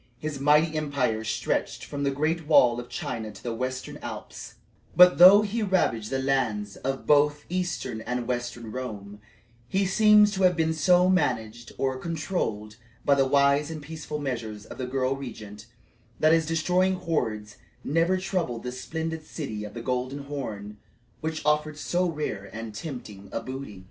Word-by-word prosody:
His 150 -1 -5
mighty 150 +3 +4
empire 135 -7 -1
stretched 110 - -2
from 145 -1 -5
the 140 - +2
great 155 +3 -1
wall 125 -6 +5
of 120 - -8
China 110 -2 -4
to - - -14
the 120 - -3
Western 130 +2 -4
Alps; - - -8 0.4
but, 180 -1 +7
though 195 +4 +9
he 215 +2 -2
ravaged 175 - +1
the 135 - -1
lands 120 -7 -1
of 135 0 -3
both 150 0 +3
eastern 175 -10 -3
and 125 +1 -3
western 120 -2 -4
Rome, 105 -5 -6 0.5
he 195 +8 +1
seems 210 +2 +5
to 195 -2 -3
have 180 -1 +5
been 160 0 +1
so 180 +3 +4
managed 120 -10 0
or 130 -1 -1
controlled 150 - -3 0.3
by 140 - +5
the 135 -1 +3
wise 140 +2 +3
and 160 -1 -5
peaceful 150 0 -6
measures 115 -7 -4
of - - -11
the 130 - -3
girl 130 +1 0
regent, 110 -5 -9 0.5
that 155 +1 +5
his 165 -2 +2
destroying 180 +4 +2
hordes 110 -12 -3 0.3
never 165 +5 +2
troubled 175 -10 -2
the 125 - -4
splendid 160 +4 -4
city 110 -9 -5
by - - -6
the 115 +2 -8
Golden 130 +3 -2
Horn 110 -8 -6 0.4
which 160 -1 -4
offered 150 0 +1
so 175 +4 0
rare 150 -11 -4
and 110 +1 -7
tempting 105 -5 -8
a - - -2
booty. 130 -6 -7
140 Hz, 165 wpm, -26 LUFS, 120-160 Hz, 0.5 s, though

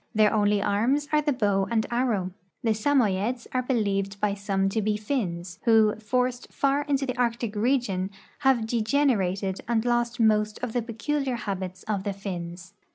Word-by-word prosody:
Their 215 -1 +4
only 205 -1 +2
arms 245 +9 +1
are 300 0 +4
the 295 0 +1
bow 205 -6 +1
and 225 -2 +1
arrow. 235 -7 0 0.3
The 225 - +2
Samoyeds 230 -1 +1
are 255 - +2
believed 200 -6 -1
by 205 -1 +1
some 195 -1 0
to 220 +3 -1
be 210 0 0
Finns, 185 -7 -3
who, 220 -2 +5
forced 250 +3 -1
far 280 +1 +1
into 275 -2 0
the 255 -2 -3
Arctic 235 -2 0
region, 210 -5 0 0.3
have 265 -5 +3
degenerated 215 -5 +1
and 230 -1 +1
lost 240 0 0
most 215 -1 +3
of 240 -3 -2
the 245 - +1
peculiar 255 +4 -2
habits 190 -5 -5
of 205 -3 -2
the 200 -1 -2
Finns. 185 -1 -7
220 Hz, 165 wpm, -26 LUFS, 200-245 Hz, 0.3 s, who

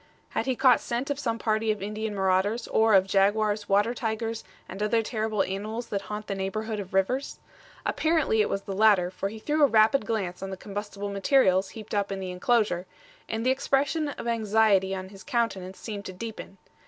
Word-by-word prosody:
Had - - -2
he 260 - +1
caught 255 -1 +5
scent 245 +4 -3
of 285 - -2
some 230 -5 -1
party 220 0 0
of 215 -1 +1
Indian 210 +2 -4
marauders, 190 +4 +1
or 220 -1 +4
of 190 -1 +5
jaguars, 205 +2 +1
water 205 +4 +3
tigers, 225 -1 -3 0.2
and 190 +2 -8
other 225 +2 +2
terrible 215 -2 -1
animals 215 +5 -4
that 200 - -2
haunt 210 +1 -6
the 200 - -3
neighborhood 210 +3 -3
of 190 -1 -6
rivers? 250 +9 0 0.5
Apparently 315 -9 +2
it 210 - +1
was 195 - -2
the 195 - -5
latter, 195 -3 +4
for 195 +1 -3
he 220 - -8
threw 300 +7 -1
a - - +8
rapid 220 0 +4
glance 190 -6 -2
on 195 - -4
the 190 - -6
combustible 205 0 -6
materials 195 -3 +3
heaped 215 -1 -10
up 200 -1 0
in 195 - -3
the 185 -1 -4
inclosure, 185 -2 +1 0.4
and 225 +1 -2
the 255 - +4
expression 280 +3 +1
of 285 - -6
anxiety 215 -4 +2
on 190 0 -6
his 195 -1 -13
countenance 230 -8 -2
seemed 205 -3 -6
to 185 - -6
deepen. 215 0 -8
215 Hz, 200 wpm, -27 LUFS, 195-230 Hz, 0.5 s, a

